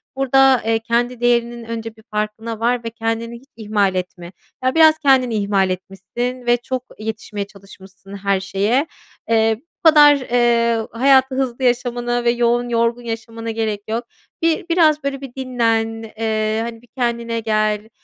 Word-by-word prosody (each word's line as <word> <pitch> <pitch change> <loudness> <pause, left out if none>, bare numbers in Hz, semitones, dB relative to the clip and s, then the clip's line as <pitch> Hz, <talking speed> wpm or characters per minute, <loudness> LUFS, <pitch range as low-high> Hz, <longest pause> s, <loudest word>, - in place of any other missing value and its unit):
Burada, 270 -1 +4
eee, 225 0 +1
kendi 235 +2 -1
değerinin 240 -1 +1
önce 225 -1 -6
bir 220 - -19
farkına 215 +1 -3
var 240 +1 0
ve 230 - -3
kendini 230 0 -3
hiç 260 - -22
ihmal 205 -3 0
etme. 180 -1 -5 0.3
Ya, 255 +2 +1
biraz 315 -1 +6
kendini 260 -5 +3
ihmal 200 -2 +1
etmişsin 195 +7 -5
ve 240 0 +3
çok 250 +1 -4 0.2
yetişmeye 215 -2 -5
çalışmışsın 195 -1 -15
her 200 0 0
şeye. 205 +9 0 0.4
Eee, 225 -1 +2
bu 335 +1 +2
kadar, 295 -2 +7
eee, 235 -2 +2
hayatı 265 +2 +3
hızlı 260 -1 -2
yaşamana 245 -1 0
ve 235 - +3
yoğun, 240 0 +1
yorgun 235 +1 +1
yaşamana 230 0 -5
gerek 220 -2 -2
yok. 230 +2 -2 0.4
Bir 330 0 +1
biraz 315 -3 +3
böyle 275 -1 -3
bir 270 -3 -9
dinlen. 225 -3 -1
Eee, 220 -1 0
hani, 230 -1 -7
bir 245 - -22
kendine 235 -2 -1
gel. 215 -1 0
230 Hz, 155 wpm, -19 LUFS, 220-245 Hz, 0.4 s, kadar